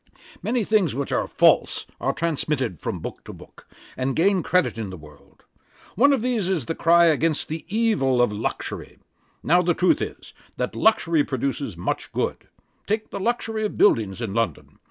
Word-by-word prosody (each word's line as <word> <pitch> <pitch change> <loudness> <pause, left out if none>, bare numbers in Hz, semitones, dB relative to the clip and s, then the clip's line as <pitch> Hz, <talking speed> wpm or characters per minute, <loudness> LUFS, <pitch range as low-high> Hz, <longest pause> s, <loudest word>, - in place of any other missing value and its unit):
'Many 235 +1 0
things 195 - +1
which 140 0 -3
are - - 0
false - - +3
are - - 0
transmitted 150 - -2
from - - -4
book - - -7
to - - -8
book, - - -15 0.3
and 130 +1 -2
gain 190 +2 +3
credit 180 +1 +1
in 110 -3 -5
the 95 - -8
world. 75 -2 -18 0.5
One 280 +8 +4
of 265 -5 +1
these 240 -7 0
is 180 -9 -1
the 165 - -2
cry 170 +1 +4
against 160 -1 +1
the 160 0 -5
evil 200 - +1
of 120 -3 +3
luxury. 105 +2 -5 0.5
Now 175 +3 +4
the 175 -1 +1
truth 185 - +2
is, - - -6 0.2
that - - -3
luxury 170 -8 +3
produces 135 - -3
much 90 - -3
good. - - -2 0.4
Take 215 +1 -2
the - - -4
luxury 225 0 -1
of 210 - -3
buildings 110 - +3
in 110 -4 -3
London. 115 +1 -3
165 Hz, 175 wpm, -23 LUFS, 130-205 Hz, 0.5 s, One